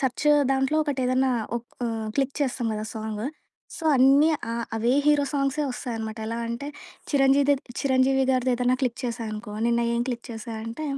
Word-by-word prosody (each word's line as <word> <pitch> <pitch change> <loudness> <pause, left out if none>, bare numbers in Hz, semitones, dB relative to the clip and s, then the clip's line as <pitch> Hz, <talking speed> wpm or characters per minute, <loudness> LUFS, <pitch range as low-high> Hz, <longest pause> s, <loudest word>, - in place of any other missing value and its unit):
Search 265 +1 -1 0.3
దాంట్లో 270 +3 +1
ఒకటేదన్నా 260 -2 +1 0.3
ఓహ్! 240 - -7 0.5
Click 275 -1 0
చేస్తాం 255 -3 -1
కదా 215 0 -3
సాంగు. 220 +2 -3 0.5
సో 330 - -8
అన్నీ 275 +4 +6 0.2
ఆహ్, 235 0 -2
అవే 235 +2 +2
హీరో 295 -1 +4
సాంగ్స్ 275 0 0
వస్తాయనమాట. 225 -3 -5
ఎలా 230 +1 -3
అంటే 235 +4 -4 0.4
'చిరంజీవిదే' 280 0 +4 0.2
'చిరంజీవి' 265 0 +3
గారిదేదైనా 255 -1 +2
క్లిక్ 250 -3 -1
చేశా 235 0 -3
అనుకో 210 0 -7
నిన్న 235 0 +2
ఏం 235 - 0
క్లిక్ 240 -1 -4
చేశా 225 0 -7
అంటే 230 +7 -5
255 Hz, 155 wpm, -25 LUFS, 235-275 Hz, 0.5 s, అన్నీ